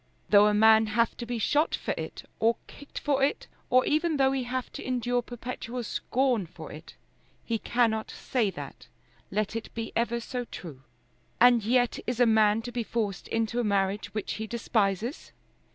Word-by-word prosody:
Though 205 0 +7
a 210 - +3
man 220 +1 +6
have 230 +2 +1
to 235 - -6
be 240 0 -2
shot 295 +8 +2
for - - -3
it, - - -6 0.2
or 230 +1 +3
kicked 285 - -13
for 280 -2 0
it, 275 - +1 0.2
or 255 +1 +4
even 315 +1 +1
though 265 -1 +4
he 265 -2 -1
have 255 +1 -3
to - - -7
endure 245 -1 0
perpetual 245 0 -6
scorn 245 -3 0
for 160 -2 -10
it, 155 +2 -11 0.5
he 230 -1 -1
cannot 225 -2 +1
say 235 -6 -1
that, - - -9 0.4
let 215 +2 -1
it 225 - -5
be 225 -1 -4
ever 235 0 +1
so 245 +1 -4
true. 155 - -9 0.6
And 240 -2 +6
yet 245 +2 +2
is 245 0 -2
a 245 - +6
man 220 -1 +4
to 245 - -6
be 240 - -2
forced 215 -5 -3
into 225 +1 -1
a - - +1
marriage 200 -1 0
which 215 -2 -3
he 220 0 -5
despises? 225 - -1
230 Hz, 185 wpm, -28 LUFS, 215-245 Hz, 0.6 s, Though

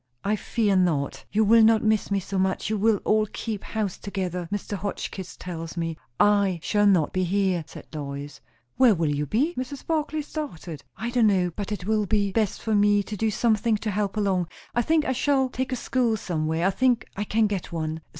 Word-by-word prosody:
"I 210 +2 +1
fear 210 -1 0
not. 165 -7 0
You 215 +2 +3
will 225 +2 +6
not 220 0 +5
miss 215 -2 +2
me 200 -1 +1
so 195 +1 -3
much; 190 +2 0
you 215 - +1
will 220 +1 +3
all 215 0 +3
keep 215 0 -5
house 210 -4 -3
together, 180 -3 -4
Mr. 205 0 -3
Hotchkiss 190 -1 -5
tells 165 -2 -6
me." 165 -1 -2 0.2
"I 200 -4 +3
shall 205 -1 +3
not 180 -7 +3
be 185 - +1
here," 185 -2 +1
said - - -11
Lois. 140 -1 -6 0.4
"Where 245 -5 +6
will 160 -3 0
you 145 0 -2
be?" 275 - +1
Mrs. 260 -1 -6
Barclay 310 -1 -1
started. 185 - -6
"I 230 +4 -3
don't 240 -3 +4
know; 185 -3 +2
but 205 0 -4
it 200 -4 -4
will 215 -1 +1
be 205 -1 +1
best 215 -1 -1
for 220 - 0
me 205 0 +4
to 210 - -6
do 220 +2 0
something 220 0 +2
to 210 0 -3
help 205 +1 -1
along. 190 -4 +1 0.3
I 240 - +2
think 315 +3 +2
I - - 0
shall 265 0 +2
take 260 +1 -3
a - - 0
school 240 -2 0
somewhere. 160 -2 -1
I 195 - +4
think 245 +3 +2
I 205 - -2
can 220 +2 +2
get 200 -5 -3
one." 160 -1 -3
205 Hz, 210 wpm, -25 LUFS, 180-225 Hz, 0.4 s, will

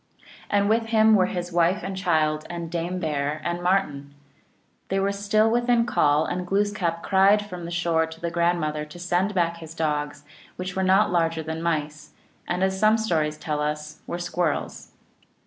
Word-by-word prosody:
And 200 0 +2
with 225 +1 +1
him 220 -1 +4
were 185 -3 +4
his 175 -1 -4
wife 175 +3 +2
and 195 - -4
child 155 -5 0
and 170 -1 -6
Dame 175 +1 -2
Bear 150 -2 -2
and 175 0 -2
Martin. 145 -7 -1 0.7
They 195 - 0
were 195 +1 +1
still 205 +2 +2
within 240 0 +2
call, 150 -8 +2
and 180 0 -3
Glooskap 195 -4 0
cried 200 +2 +4
from 180 -4 -7
the - - -6
shore 170 -2 +1
to 160 0 -11
the 170 0 -3
grandmother 170 -3 0
to 150 +3 -11
send 180 +3 0
back 170 -2 +1
his 165 -1 -10
dogs, 150 -2 -2 0.3
which 185 0 -5
were 190 - 0
not 190 +2 +3
larger 165 -2 +1
than 160 +1 -5
mice, 155 -3 -3 0.3
and, 180 +2 -1
as 190 0 0
some 215 +1 +4
stories 160 -8 0
tell 150 -2 -3
us, 150 0 -4
were 175 - -3
squirrels. 175 -2 -2
175 Hz, 180 wpm, -24 LUFS, 160-195 Hz, 0.7 s, him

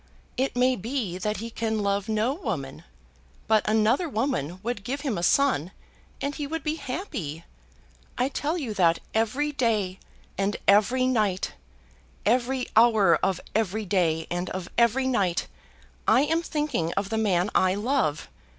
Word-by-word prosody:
It 265 0 -1
may 255 +1 +3
be 220 -4 -3
that 210 +3 -1
he 230 +2 -6
can 220 -2 -1
love 200 +1 0
no 220 +4 +1
woman. 170 - -5 0.6
But 215 -1 +3
another 220 +10 +2
woman 215 - -2
would 230 -3 -3
give 275 +6 -3
him 270 -7 -1
a 170 - -3
son, 180 - +2 0.5
and 280 +1 -2
he 290 -1 -4
would 325 +2 -4
be 305 - 0
happy. 195 - -5 0.7
I 250 - +2
tell 290 +4 -2
you 260 -10 -3
that 170 -4 +3 0.2
every 240 +7 +1
day 215 -9 0 0.4
and 195 +1 0
every 215 +6 +4
night, 215 -7 +1 0.7
every 250 +3 +1
hour 220 -6 +5
of 190 -3 +1
every 215 0 0
day 170 -4 +1
and 175 +1 -2
of 185 -2 -5
every 235 +3 +3
night, 195 -9 +1 0.6
I 260 - +6
am 325 +3 +1
thinking 295 - -1
of 200 0 -2
the 220 0 -1
man 190 -2 +1
I 185 0 +3
love. 210 - 0
220 Hz, 155 wpm, -26 LUFS, 190-260 Hz, 0.7 s, I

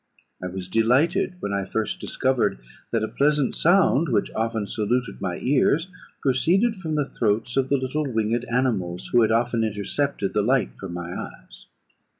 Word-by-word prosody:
I - - -2
was 90 0 -6
delighted 140 - +2
when 100 - -3
I 100 0 0
first 110 +3 -2
discovered 130 - 0 0.3
that 115 -2 0
a - - 0
pleasant 145 0 +1
sound, 170 -3 +3
which 120 - 0
often 110 -1 -1
saluted 115 +5 -1
my 90 -3 -2
ears, 145 +6 +2 0.3
proceeded 175 - +3
from 165 -7 -4
the 145 -2 +1
throats 115 -1 -1
of 135 -1 +1
the 140 - +3
little 135 +2 -2
winged 115 +2 0
animals 115 -8 -1
who 120 - +5
had 110 - +3
often 115 0 +1
intercepted 105 +2 -2
the 105 - +2
light 125 +5 +1
from 95 -3 -8
my 85 0 -5
eyes. - - -10
120 Hz, 165 wpm, -24 LUFS, 105-140 Hz, 0.3 s, who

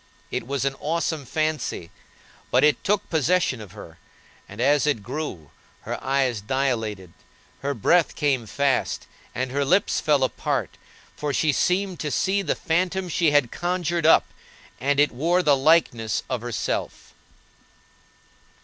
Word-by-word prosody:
It 115 - -3
was 140 0 -1
an 135 - 0
awesome 160 -2 -2
fancy, 155 - -2 0.6
but 125 +3 +3
it 150 0 +3
took 205 0 0
possession 160 -5 +1
of 100 -4 -11
her, 85 -6 -12 0.5
and, 105 - -11
as 145 +4 +3
it 115 -8 0
grew, 120 - -6 0.3
her - - -6
eyes 130 -5 0
dilated, 110 -7 -2 0.5
her 140 0 -2
breath 165 - +2
came 135 -7 0
fast, 140 +2 0 0.3
and 130 +1 -2
her 140 +2 0
lips 185 +8 +2
fell 145 -3 +2
apart, 130 - -1 0.4
for 150 -1 -2
she 155 +2 +2
seemed 180 +4 0
to 150 - -2
see 195 +6 +1
the - - -1
phantom 180 +2 -1
she 165 -1 +2
had 145 -5 +2
conjured 175 -2 -1
up, - - +6 0.5
and 140 +1 +1
it 145 - +4
wore 170 +8 +1
the 145 -3 +5
likeness 135 -7 +2
of 125 -3 -1
herself. 120 -1 -4
145 Hz, 145 wpm, -24 LUFS, 125-165 Hz, 0.6 s, up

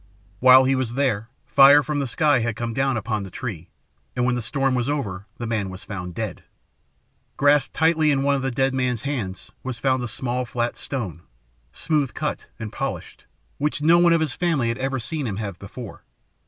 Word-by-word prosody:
While 130 +1 +8
he 130 +1 +2
was 130 -3 -1
there 120 -5 0 0.2
fire 140 +2 +7
from 150 0 -2
the 140 - -1
sky 145 0 +2
had 115 -1 -1
come 115 +1 -3
down 135 0 +1
upon 110 0 -2
the 95 - -7
tree, 90 -6 -6 0.5
and 125 -1 +1
when 125 - +2
the 120 - -1
storm 135 +3 0
was 125 +1 0
over 105 -9 -3
the 120 - -4
man 110 -4 -1
was 95 +1 -9
found 90 -4 -6
dead. 110 -2 -4 0.9
Grasped 145 -1 +3
tightly 160 -1 +3
in 135 -2 +2
one 140 0 +3
of 140 - 0
the 135 - -1
dead 135 +1 +1
man's 125 -3 -1
hands 115 -10 -4
was 130 -2 -4
found 130 0 +1
a 120 - -3
small 125 +2 -2
flat 120 0 -2
stone, 100 - -5 0.5
smooth 150 - -1
cut - - -3
and 110 -1 -7
polished, - - -5 0.3
which 150 0 -1
no 170 +2 +6
one 175 -1 +5
of 165 -1 +4
his 155 -5 0
family 160 -9 0
had 115 +2 -3
ever 135 0 -1
seen 145 +3 -4
him 105 - -3
have 100 -4 -5
before. 105 +2 -9
130 Hz, 205 wpm, -23 LUFS, 110-140 Hz, 0.9 s, While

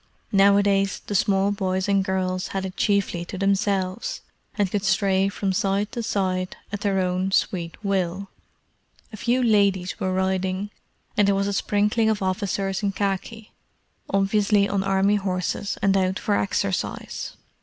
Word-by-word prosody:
Nowadays 200 0 +3
the - - -4
small 195 0 +2
boys 190 -1 -1
and 195 -1 +3
girls 185 0 -1
had 190 - -2
it 185 0 -6
chiefly 200 -4 +1
to 185 - -7
themselves, 195 - 0 0.4
and 200 -3 +1
could 205 -2 -1
stray 195 0 +2
from 200 -1 -2
side 200 +1 0
to 245 -2 -3
side 185 -4 -1 0.2
at 205 0 -4
their 200 -2 +1
own 185 +1 0
sweet 170 -3 0
will. 190 0 -1 0.9
A - - -6
few 245 +4 +1
ladies 200 -5 +2
were 185 - -1
riding, 190 +1 -1 0.4
and 205 -1 +3
there 200 - +3
was 200 0 +1
a 200 - -1
sprinkling 210 +3 +1
of 210 -3 0
officers 195 0 -1
in 200 -1 0
khaki; 205 +3 -3 0.6
obviously 200 +1 +2
on 200 -1 0
Army 195 +1 +2
horses 190 +1 -2
and 195 -1 +4
out 190 0 +1
for 205 - 0
exercise. 195 -1 -2
195 Hz, 155 wpm, -24 LUFS, 190-205 Hz, 0.9 s, and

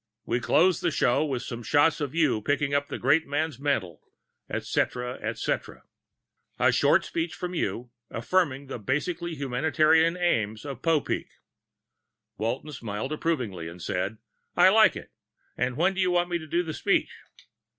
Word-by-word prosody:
We 120 - 0
close 175 +7 +3
the - - +2
show 120 - +2
with 135 -5 -2
some 120 -2 -6
shots 145 +7 +3
of 145 +1 -3
you 140 -10 +2
picking 145 +4 0
up 145 0 +1
the - - -5
great 145 +6 +2
man's 145 -1 -2
mantle, 95 - -1 0.5
etcetera, 125 0 -2
etcetera. - - -3 0.7
And - - +4
a - - +4
short - - +3
speech 165 0 -3
from 180 0 -5
you 125 -7 -3 0.2
affirming 140 +1 0
the 130 -2 -6
basically 165 - -2
humanitarian 155 +5 +2
aims 110 -12 0
of 135 -3 -6
Popeek." 165 -3 0 1.1
Walton 120 +7 -2
smiled 120 +1 -4
approvingly 125 - -2
and 85 +2 -9
said, 90 +5 -2 0.4
"I 180 +1 +8
like 220 +2 +5
it. - - -9 0.4
When 135 +10 +1
do 190 - -1
you 185 - +2
want 175 0 +1
me 175 -1 -1
to 155 - -10
do 175 +3 +1
the 160 -2 -5
speech?" - - +1
145 Hz, 160 wpm, -27 LUFS, 125-165 Hz, 1.1 s, I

